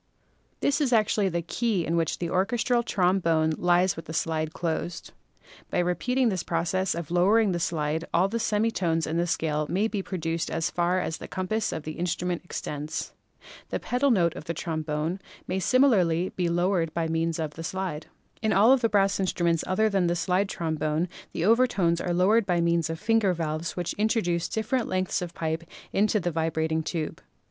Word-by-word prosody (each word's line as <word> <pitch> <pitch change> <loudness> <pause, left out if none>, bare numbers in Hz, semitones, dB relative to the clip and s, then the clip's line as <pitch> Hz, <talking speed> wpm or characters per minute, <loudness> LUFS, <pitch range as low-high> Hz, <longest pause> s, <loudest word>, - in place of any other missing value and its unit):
This 285 +2 +1
is 270 -4 +1
actually 215 -3 +3
the 170 -1 -2
key 205 0 -1
in 165 - 0
which 165 -1 0
the 175 - -3
orches 195 +6 0
tral 240 -2 +2
trombone 175 -6 +2
lies 175 +1 +3
with 165 0 -7
slide 160 -1 -1
closed. 170 0 -4 0.6
By - - -2
repeating 235 +9 +1
this 185 -4 -1
process 170 +2 -1
of 170 -2 -5
lowering 200 +4 +4
the 175 - -1
slide 160 -1 -1
all 180 +3 +3
the 230 +4 -2
semi 220 +1 +1
tones 165 -5 0
in 160 +1 -2
the 170 +1 +1
scale 155 -2 -1
may 195 +6 +1
be 210 -3 -2
produced 165 -3 -3
as 165 0 -1
far 175 +1 +1
as 160 - -3
the - - -9
compass 195 +3 -2
of 160 - -4
the 155 +1 -7
instrument 180 0 -2
extends. 150 -3 -5 0.6
The - - -2
pedal 255 +3 +1
note 175 -9 +3
of - - -8
the 170 - -3
trombone 155 +2 -2 0.3
may 185 +1 -2
similarly 190 -8 +3
be 175 -2 -1
lowered 175 -1 +1
by 165 -1 0
means 165 0 0
of 155 -3 -3
the 165 - -7
slide. 175 -3 -4 0.3
In 220 -1 +1
all 220 +7 +6
the 240 -3 +1
brass 195 -1 +2
instruments 170 -3 +1
other 185 +4 +2
than 195 -4 +1
the 170 - +1
slide 185 +3 +1
trom 160 -3 -3
bone 155 +3 0 0.2
the 165 - -2
overtones 205 -7 +3
are 175 - -2
lowered 195 +5 +3
by 175 -2 +2
means 170 -1 +1
of 165 0 -4
finger 210 -3 +2
valves 160 +1 -3
which 175 -2 -2
introduce 175 -6 +1
different 225 +3 -1
lengths 185 -1 -1
of 175 -1 -6
pipe 160 0 -2 0.3
into 210 +1 +2
the 175 -2 -1
vibrat 160 0 -1
ing 160 0 +1
tube. 160 -1 -4
175 Hz, 190 wpm, -26 LUFS, 165-195 Hz, 0.6 s, all